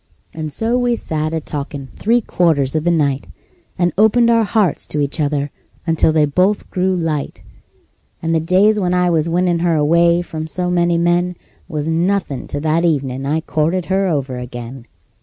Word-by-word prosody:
And 155 -1 -5
so 230 - 0
we 245 -1 +1
sat 155 -7 -3
a 160 - -1
talkin' 140 -2 -6
three 235 +3 +2
quarters 160 - +1
of 155 +1 -1
the - - +3
night, 145 -5 0 0.5
And 175 0 +1
opened 230 +2 +4
our 230 -1 +4
hearts 205 -6 0
to 150 - -2
each 145 +2 -1
other 145 -1 -1 0.3
until 160 -1 +3
they 155 -1 +3
both 180 +8 +1
grew 185 0 +1
light; 160 -5 -3 0.8
And 165 0 -1
the 165 - +3
days 190 +6 +3
when 180 -2 0
I 180 -1 +2
was 165 0 +1
winnin' 175 0 +1
her 170 -1 +1
away 170 +3 +3
from 160 -2 -6
so 180 +3 -2
many 175 -1 +2
men 175 +1 +1 0.3
Was 155 -3 -3
nothin' 165 -4 -1
to 145 - -4
that 160 +2 +1
evenin' 135 -5 -1
I 155 +3 0
courted 165 +3 -1
her 195 0 +2
over 135 -6 -2
again. 120 0 -8
165 Hz, 180 wpm, -18 LUFS, 150-180 Hz, 0.8 s, opened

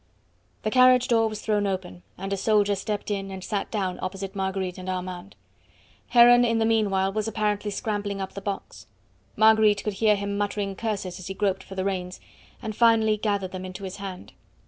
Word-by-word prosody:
The 215 - -1
carriage 255 0 +5
door 225 -2 +4
was 215 -1 -6
thrown 210 -2 +1
open, 140 - -4 0.2
and 195 +1 -4
a - - +2
soldier 205 +1 +2
stepped 205 +1 -3
in 195 -1 -3
and 190 -1 -7
sat 205 -1 -3
down 190 -4 -2
opposite 195 +1 -5
Marguerite 190 -1 -2
and 185 0 -6
Armand. 185 +1 -5 0.7
Heron 245 0 +7
in 230 -1 +2
the 225 - +2
meanwhile 200 -4 +1
was 215 +1 -1
apparently 210 -1 -1
scrambling 205 -2 -3
up 190 0 -5
the 200 - -7
box. 195 - -6 0.5
Marguerite 220 -1 +5
could 210 - -2
hear 215 -1 +5
him 200 0 -3
muttering 205 -1 -2
curses 195 -5 -3
as 185 - -8
he 195 - -5
groped 195 -1 0
for 195 - -11
the 190 0 -2
reins, 185 -2 -3 0.4
and 215 -1 -4
finally 225 -2 +4
gathered 200 -3 -1
them 185 0 -6
into 185 +1 -8
his 190 -1 -6
hand. 195 -2 -8
200 Hz, 190 wpm, -25 LUFS, 190-215 Hz, 0.7 s, Heron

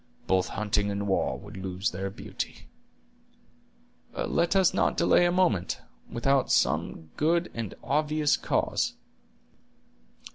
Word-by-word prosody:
Both 95 -1 +2
hunting 105 0 0
and 100 0 -2
war 95 - +1
would - - -11
lose 95 +1 -2
their 95 +2 -3
beauty." 95 - -6 1.5
"Let 170 +3 +1
us 190 -2 +4
not - - +1
delay 175 - +4
a - - +1
moment, 175 - +1 0.3
without 135 +3 +1
some 80 -1 +1
good 170 +3 +1
and 115 -4 -5
obvious 150 +2 +2
cause." - - 0
115 Hz, 115 wpm, -28 LUFS, 95-155 Hz, 1.5 s, us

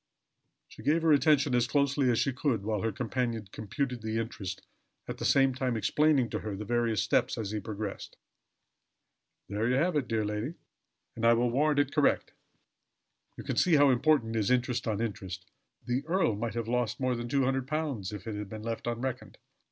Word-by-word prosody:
She - - -13
gave 155 +7 +2
her 160 - +4
attention 145 -2 +3
as 120 -1 +3
closely 140 -1 +2
as 120 - +2
she 135 - +1
could, 125 -5 -1
while 105 -1 -1
her 115 - 0
companion 120 -3 -2
computed 125 +4 -3
the 110 0 -2
interest, 105 -4 -5 0.4
at - - -6
the - - -3
same 135 -1 +4
time 125 -2 -1
explaining 130 +2 +2
to - - -2
her 105 -2 -5
the 105 +2 -6
various 115 -1 +1
steps - - +1
as 105 -3 -3
he 110 - -2
progressed. 105 0 -6 1.3
"There 105 +3 -1
you 125 - +2
have 170 +5 +1
it, 140 -5 0
dear 110 -2 0
lady; 105 +9 -3 0.6
and 115 - -6
I 115 0 +6
will 120 +1 +2
warrant 145 +3 +2
it 145 -1 +1
correct. 150 -2 +2 1.0
You - - -7
can - - -3
see 175 -3 +4
how 145 -2 +6
important 125 -3 +2
is 105 -3 +1
interest 125 -1 +1
on 110 -1 -1
interest. 95 -5 -5 0.4
The 125 +2 -1
earl 165 - +2
might 115 +2 -3
have 115 -1 -2
lost 120 -1 -1
more 130 -1 +1
than 120 0 -4
£200 135 -4 -1
if 105 -3 -7
that 110 - -5
had 105 -1 -5
been 110 0 -7
left 115 +1 -4
unreckoned." 125 +2 -4
120 Hz, 190 wpm, -29 LUFS, 110-135 Hz, 1.3 s, I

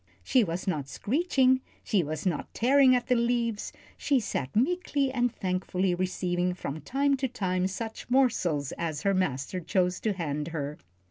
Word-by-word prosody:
She 255 -3 +4
was 175 -1 -3
not 150 -7 -1
screeching, 260 - +2 0.2
she 205 -5 +2
was 155 +2 -4
not 175 -5 -1
tearing 260 +2 +5
at 245 -1 0
the 255 - +2
leaves, 235 -2 0 0.3
she 275 -2 +2
sat 140 - -3
meekly 280 +1 +1
and 245 -2 +1
thankfully 185 -2 -1
receiving 180 0 -1
from 155 -4 -5
time 280 +1 +1
to 265 0 0
time 185 -6 -1
such 225 +5 -6
morsels 185 - +2
as 155 -3 -3
her 200 - +3
master 185 -2 -1
chose 180 +1 0
to 215 - 0
hand 150 -5 -3
her. 150 -3 -4
190 Hz, 160 wpm, -28 LUFS, 170-250 Hz, 0.3 s, tearing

